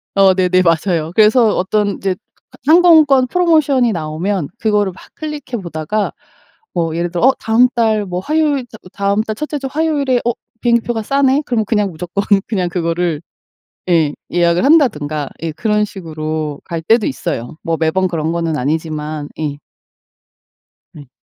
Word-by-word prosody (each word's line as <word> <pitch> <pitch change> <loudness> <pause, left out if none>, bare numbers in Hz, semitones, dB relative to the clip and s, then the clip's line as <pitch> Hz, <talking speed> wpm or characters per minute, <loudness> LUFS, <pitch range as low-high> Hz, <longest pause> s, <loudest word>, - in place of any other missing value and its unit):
어 195 -1 +5
네네. 185 -1 +3
맞아요. 165 -1 +1
그래서 220 +1 +4
어떤 205 +2 0
이제 195 - -1 0.6
하 310 - +6
항공권 315 -7 +6
프로모션이 300 -7 +2
나오면 165 +1 -2
그거를 210 -3 +1
막 185 - -15
클릭해 290 -6 -5
보다가 170 +5 -2 0.6
뭐 165 -2 -1
예를 170 +1 -1
들어 175 +6 +1
'어 265 - +5
다음 225 +3 +4
달 220 -3 +1
뭐 180 -1 -3
화요일 295 +2 0
다 220 - -13 0.2
다음 200 +2 0
달 220 -1 -4
첫째 300 +4 -4
주 270 - -4
화요일에 290 -5 +1
어 240 - +2 0.3
비행기표가 235 -1 +1
싸네?' 275 +3 +2
그럼 225 -3 0
그냥 210 -2 0
무조건 180 +4 -4 0.2
그냥 185 -5 -1
그거를 170 -2 -1 0.7
예. 160 -4 +2 0.2
예약을 170 0 +2
한다든가 155 - +2
예. 165 -1 -2
그런 210 +5 0
식으로 155 -6 -5
갈 165 -1 -4
때도 220 +6 +3
있어요, 120 +1 -4
뭐 165 0 -1
매번 175 +4 +1
그런 165 -2 -2
거는 165 -2 -1
아니지만 150 +1 -3
예. 145 -2 -3 1.4
네. 145 -3 -12
195 Hz, 315 characters per minute, -16 LUFS, 165-240 Hz, 1.4 s, 하